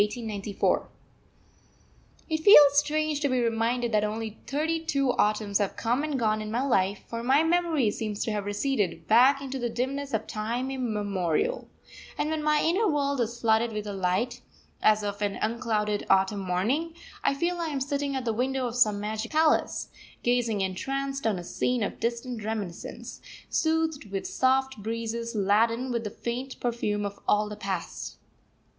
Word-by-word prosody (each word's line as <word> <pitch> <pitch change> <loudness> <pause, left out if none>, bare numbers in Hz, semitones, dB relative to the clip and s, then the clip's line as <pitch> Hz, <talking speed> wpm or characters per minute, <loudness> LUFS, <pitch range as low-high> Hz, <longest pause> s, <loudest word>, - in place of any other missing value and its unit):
_ 210 -2 -1 1.4
It 315 -1 -1
feels 290 -5 +8
strange 305 0 0
to 290 -1 0
be 255 -1 +1
reminded 235 +1 0
that 210 -1 +2
only 220 +1 -3
thirty 320 +4 -1
two 275 -4 +1
Autumns 210 -2 +1
have 200 -2 -1
come 245 +5 0
and 300 -3 -1
gone 215 -3 +1
in 215 - -5
my 235 +4 0
life; 200 -7 +1
for 230 0 -5
my 265 +6 +4
memory 325 -8 +2
seems 210 -1 -3
to 225 - -2
have 205 -1 -2
receded 205 -2 -1
back 260 +5 +5
into 270 0 -4
the 240 -1 -1
dimness 270 +4 -3
of 220 -2 -1
time 235 +5 -3
immemorial; 210 - -1 0.5
and 305 - -1
when 315 -1 -1
my 300 0 +2
inner 380 +7 +2
world 280 -3 0
is 235 +1 -3
flooded 225 0 +2
with 210 0 -4
a 205 - -4
light, 195 +6 -1 0.4
as 215 0 +4
of 205 0 -4
an 205 -1 0
unclouded 215 -2 -1
autumn 195 +1 +3
morning, 220 - -1 0.3
I - - +2
feel 345 +4 -1
I 335 - -1
am 290 -3 -2
sitting 280 0 -2
at 260 -2 -3
the 225 - 0
window 260 +3 -1
of 240 - -3
some 215 -5 +3
magic 215 +2 -4
palace, 315 0 +2 0.3
gazing 240 -4 +1
entranced 270 +8 -2
on 210 -4 +1
a 175 - -6
scene 245 +6 -1
of - - -4
distant 235 -1 -3
reminiscence, 210 -5 -5 0.3
soothed 320 -7 0
with 195 0 -3
soft 265 -2 +1
breezes 230 +2 -3
laden 230 +5 +2
with 235 -1 -1
the - - -2
faint 245 +5 -5
perfume 210 -4 -1
of 200 0 -6
all 210 0 +3
the 210 - -6
Past. 190 -4 -5
235 Hz, 170 wpm, -27 LUFS, 210-275 Hz, 1.4 s, feels